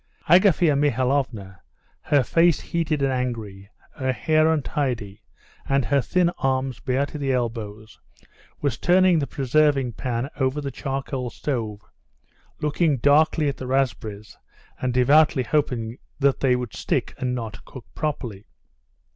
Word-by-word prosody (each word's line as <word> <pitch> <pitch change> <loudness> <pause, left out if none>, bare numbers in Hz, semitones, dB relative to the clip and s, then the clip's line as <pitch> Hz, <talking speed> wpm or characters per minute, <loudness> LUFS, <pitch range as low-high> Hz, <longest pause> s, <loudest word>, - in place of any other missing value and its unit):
Agafea 175 -3 +5
Mihalovna, 130 -7 0 0.4
her 145 -3 +2
face 165 +4 +3
heated 160 -4 -2
and 135 - +2
angry, 110 -6 -4 0.2
her 130 -1 -1
hair 155 +4 +2
untidy, 125 -9 -2 0.5
and 135 -2 +2
her 140 +4 +2
thin 175 +5 +1
arms 130 -1 -1
bare 130 +2 0
to 150 +1 -8
the 135 -2 -1
elbows, 110 -4 -4 0.6
was 140 -4 -1
turning 180 -1 +4
the 140 - -2
preserving 135 -1 +1
pan 120 +1 -3
over 130 +1 0
the 140 -2 -4
charcoal 135 -1 -4
stove, 115 -7 -4 0.8
looking 150 0 +1
darkly 150 +4 +3
at 140 - -2
the 130 - -6
raspberries 115 -6 -2 0.4
and 130 - 0
devoutly 135 +3 +4
hoping 125 -4 -1 0.2
they 135 -2 +2
would 125 -2 -4
stick - - -2
and 125 -1 -1
not 115 -3 -6
cook 130 - -11
properly. 120 -10 -4
135 Hz, 130 wpm, -23 LUFS, 120-150 Hz, 0.8 s, Agafea